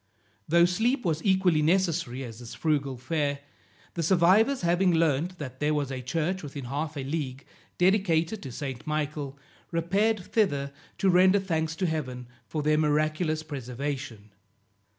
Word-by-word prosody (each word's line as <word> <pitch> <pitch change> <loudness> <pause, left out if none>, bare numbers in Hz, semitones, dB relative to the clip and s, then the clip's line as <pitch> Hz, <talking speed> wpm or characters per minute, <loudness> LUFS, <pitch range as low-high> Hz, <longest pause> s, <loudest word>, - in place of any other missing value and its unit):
Though 170 +2 +5
sleep 225 +8 +1
was 160 -2 0
equally 185 -5 +3
necessary 160 -6 +1
as 115 -2 -8
this 120 -2 -9
frugal 140 -4 0
fare, 145 +2 -1 0.6
the 170 - -2
survivors 190 - +4
having 175 +2 +3
learned 165 +2 +1
that 130 -4 -7
there 150 +1 +1
was 145 -2 -1
a 130 -1 -4
church 165 +8 -1
within 140 -2 -7
half 145 +4 -3
a 135 - -3
league, 135 -2 -4 0.3
dedicated 185 0 +2
to 135 - -7
St. 135 0 -6
Michael, 150 -2 -3 0.3
repaired 195 +6 +1
thither 145 -9 0 0.2
to 195 - +3
render 185 +2 +5
thanks 160 -4 -1
to 185 - -1
Heaven 130 -7 -3 0.2
for 155 -2 -3
their 155 +1 +3
miraculous 155 +1 +1
preservation. 130 -5 -5
155 Hz, 150 wpm, -27 LUFS, 140-180 Hz, 0.6 s, Though